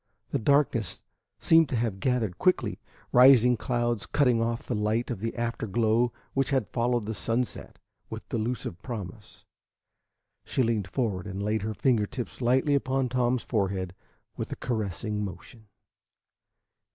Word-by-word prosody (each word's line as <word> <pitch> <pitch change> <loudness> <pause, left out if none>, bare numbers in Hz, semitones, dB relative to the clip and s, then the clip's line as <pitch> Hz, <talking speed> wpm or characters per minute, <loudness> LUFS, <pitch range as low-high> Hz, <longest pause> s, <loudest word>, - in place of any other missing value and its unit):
The 140 - 0
darkness 120 -6 +1 0.3
seemed 165 -2 +4
to - - -1
have 110 -4 -1
gathered 115 -6 0
quickly, 185 -1 +1 0.3
rising 125 -1 +7
clouds 120 -2 -1
cutting 125 -6 +2
off 115 0 -1
the - - -3
light 110 +3 0
of 120 - -4
the 115 +2 -3
after 115 -1 -2
glow 115 +3 +2 0.2
which 135 0 +1
had 130 -6 +1
followed 120 -2 0
the 110 - -3
sunset 115 +3 -3 0.3
with - - -7
delusive 110 -5 -3
promise. 105 -4 -8 1.0
She 130 - 0
leaned 110 -4 0
forward 100 -2 -2
and 95 +1 -4
laid 105 +1 0
her 110 +1 -3
finger 115 -5 +2
tips 125 +2 -6
lightly 130 +4 +3
upon 135 -2 +1
Tom's 125 0 +1
forehead 95 -4 -1 0.4
with - - -4
a - - -2
caressing 105 -2 -3
motion. 105 +4 -9
115 Hz, 145 wpm, -27 LUFS, 105-125 Hz, 1.0 s, rising